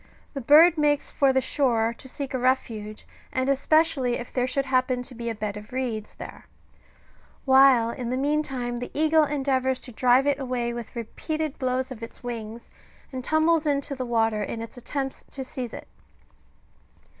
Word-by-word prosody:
The 275 - -4
bird 310 +6 +6
makes 290 -1 +1
for 275 -2 +3
the 265 0 +2
shore 235 -4 +1
to 265 - -11
seek 275 0 -5
a 260 - -1
refuge, 225 -4 -1 0.3
and 260 0 -1
especially 275 -2 +2
if 240 - -8
there 250 -1 +1
should 275 +1 -1
happen 255 -1 +1
to 255 - -8
be 235 -1 -5
a 225 - -3
bed 210 -1 -4
of 210 0 -11
reeds 245 -4 -3
there; - - -10 1.0
while 265 -4 +6
in 240 -1 -5
the 255 - -1
meantime 270 -4 -1
the 245 - -5
eagle 315 0 +4
endeavours 265 -3 0
to 250 - -8
drive 250 +3 +3
it 285 -1 +1
away 250 -3 -2
with 235 0 -7
repeated 310 +6 -4
blows 260 0 -1
of 235 -3 -8
its 230 - -10
wings, 230 -1 -6 0.4
and 260 -2 -5
tumbles 315 +2 +2
into 280 -1 0
the 260 -2 -4
water 225 -3 +1
in 225 +2 -4
its 230 - -10
attempts 270 +2 -4
to 270 - -5
seize 255 -2 -6
it. - - -9
255 Hz, 180 wpm, -25 LUFS, 235-280 Hz, 1.0 s, bird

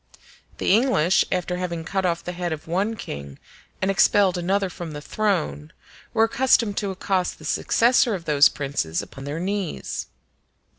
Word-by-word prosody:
The - - +2
English, 210 - +3
after 180 0 -1
having 170 -2 -3
cut 190 +1 0
off 170 -1 -1
the 180 - -4
head 175 -1 -3
of 155 -1 -5
one 195 +7 0
king 70 - -7 0.5
and 190 - +2
expelled 195 -1 +4
another 190 +3 0
from 170 -3 -7
his 145 - -8
throne, 170 -7 -1 0.4
were 220 - +3
accustomed 230 -3 +2
to 200 - -1
accost 185 -1 -1
the 155 - -13
successor 235 +6 +3
of 170 -3 -8
those 150 -1 +5
princes 135 - -2
upon 135 0 -10
their 145 +3 -4
knees. 190 - -3
180 Hz, 160 wpm, -23 LUFS, 155-200 Hz, 0.5 s, those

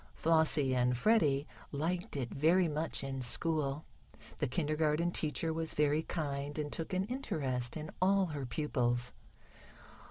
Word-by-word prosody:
Flossie 160 -4 +3
and 125 0 +2
Freddie 145 - +3 0.3
liked 165 +3 -2
it 120 -4 -3
very 170 +5 +4
much 155 -1 -2
in 135 -1 -3
school. 150 +2 0 0.5
The 145 - +1
kindergarten 155 +3 +1
teacher 160 0 -1
was 160 0 -1
very 150 +1 +3
kind, 145 -3 -3
and 150 -1 -2
took 165 - -4
an 185 0 +1
interest 145 - -2
in 155 0 -6
all 195 +1 +4
her 145 -6 -4
pupils. 125 -2 0
150 Hz, 135 wpm, -33 LUFS, 135-165 Hz, 0.5 s, very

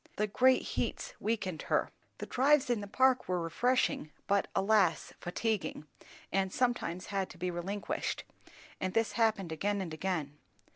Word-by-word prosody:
The 210 - +1
great 255 +5 +4
heats - - -3
weakened 200 -7 -2
her. - - +2 0.3
The - - -5
drives 275 0 +3
in 230 -3 +1
the 205 - -6
Park 260 +4 +3
were 180 -1 +1
refreshing, 170 -1 +1
but 200 0 +2
alas, 195 -3 +3
fatiguing, 205 -3 -2 0.5
and 190 -1 +1
sometimes 240 -8 0
had 195 -2 -2
to - - -12
be 180 0 -2
relinquished; 190 +4 -3 0.6
and 185 0 -2
this 225 0 +2
happened 215 -7 +1
again 200 +6 0
and 175 -5 -4
again. 155 -4 -3
200 Hz, 150 wpm, -32 LUFS, 180-230 Hz, 0.6 s, great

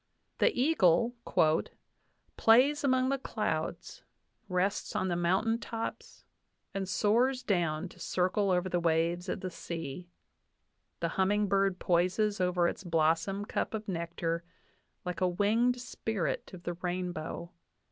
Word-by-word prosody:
The - - +4
eagle 235 - +4 1.2
"plays 260 +7 +5
among 260 -1 +3
the 275 0 0
clouds, - - -3 0.5
rests 190 +3 -1
on 185 - 0
the 175 - 0
mountain 190 +7 +1
tops, 230 -1 -6 0.5
and 195 -1 -3
soars 250 +6 +2
down 175 -6 0
to - - -17
circle 185 +2 0
over 180 0 +2
the 175 -1 0
waves 170 +1 +1
of - - -3
the 185 - -4
sea. 165 0 -6 0.9
The - - 0
humming 205 +2 +2
bird 195 -1 +2
poises 185 +4 +1
over 180 -1 +2
its 195 - -4
blossom 165 +4 +1
cup 220 - -2
of 215 0 -5
nectar 170 -2 -2 0.6
like 180 +1 -4
a 185 - +4
winged 225 +7 +2
spirit 225 -5 -3
of 180 -2 -11
the 175 - -2
rainbow. 175 -1 -4
185 Hz, 130 wpm, -31 LUFS, 175-220 Hz, 1.2 s, plays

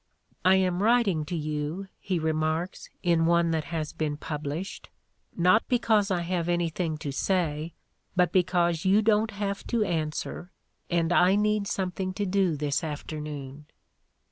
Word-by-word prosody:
"I 185 +1 +6
am 185 -1 +1
writing 210 -8 +3
to 175 - -4
you," 155 +4 -3
he 185 -2 -1
remarks, 160 +2 -1
in 170 -2 +3
one 170 0 +3
that 160 -2 -1
has 160 -3 -4
been 150 -2 -2
published, 150 +5 -5 0.5
"not 185 +5 +4
because 220 -4 +2
I 180 -3 +1
have 170 0 -1
anything 170 -2 -1
to 145 -2 -4
say, 160 0 -1 0.4
but 180 -2 +3
because 175 -2 +2
you 200 +3 +4
don't 215 0 +3
have 200 -1 -3
to 235 -3 +1
answer 165 0 -3 0.4
and 170 0 +1
I 180 +2 +5
need 210 0 +1
something 185 -1 -2
to 205 - -1
do 185 -3 +1
this 145 0 -1
after 155 0 -5
noon." 145 -1 -7
175 Hz, 150 wpm, -27 LUFS, 155-190 Hz, 0.5 s, I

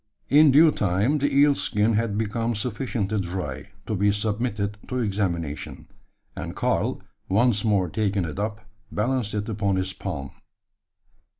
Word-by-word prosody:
In 150 +2 +7
due 155 +4 +7
time 105 +7 +1
the 145 - +1
eel 145 +1 +5
skin 105 -4 +1
had 110 -1 0
become 115 +2 -1
sufficiently 110 -2 -2
dry, 90 -7 -4 0.2
to - - -3
be 100 0 +3
submitted 105 0 -2
to 125 - -3
examination; 95 - -2 0.5
and - - -6
Karl, - - 0 0.3
once 110 +1 +3
more 100 -5 +2
taking 100 0 0
it 80 +4 -5
up, 105 +1 -3 0.3
balanced 115 -1 -1
it 105 0 -2
upon 100 -3 0
his 95 0 -1
palm. 80 -8 -5
105 Hz, 140 wpm, -25 LUFS, 95-115 Hz, 0.5 s, In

